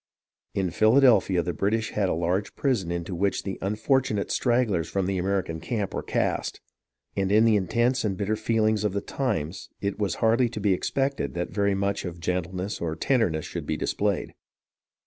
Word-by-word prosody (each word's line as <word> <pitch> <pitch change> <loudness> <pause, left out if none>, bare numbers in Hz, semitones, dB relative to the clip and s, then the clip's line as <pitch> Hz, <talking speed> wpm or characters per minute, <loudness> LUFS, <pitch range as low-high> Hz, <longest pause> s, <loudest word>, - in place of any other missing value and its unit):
In 95 -3 0
Philadelphia 110 -4 +4
the 90 - -2
British 110 +2 0
had 100 -3 0
a - - +1
large 90 +4 -1
prison 115 - 0
into 85 +1 -3
which 95 +3 0
the 95 -2 -5
unfortunate 110 +2 0
stragglers 120 -9 +1
from 95 -2 0
the 95 0 -1
American 90 -3 -1
camp 105 +1 -3
were - - -2
cast, - - -1 0.6
and 95 -1 0
in 110 +2 +5
the 110 -2 +5
intense 120 +6 +1
and 100 -4 -1
bitter 105 +2 0
feelings 110 -1 +1
of 105 -3 0
the 100 - -1
times 100 - -3
it 100 +1 -3
was 100 -4 0
hardly 115 +2 +3
to 115 - -6
be 100 -2 +3
expected 135 +7 -1
that 85 0 -3
very 100 0 +1
much 100 +1 -1
of 85 -2 -6
gentleness 90 +3 -3
or 80 -2 -2
tenderness 90 - +1
should - - -6
be - - -1
displayed. 100 -2 -1
100 Hz, 180 wpm, -26 LUFS, 90-110 Hz, 0.6 s, in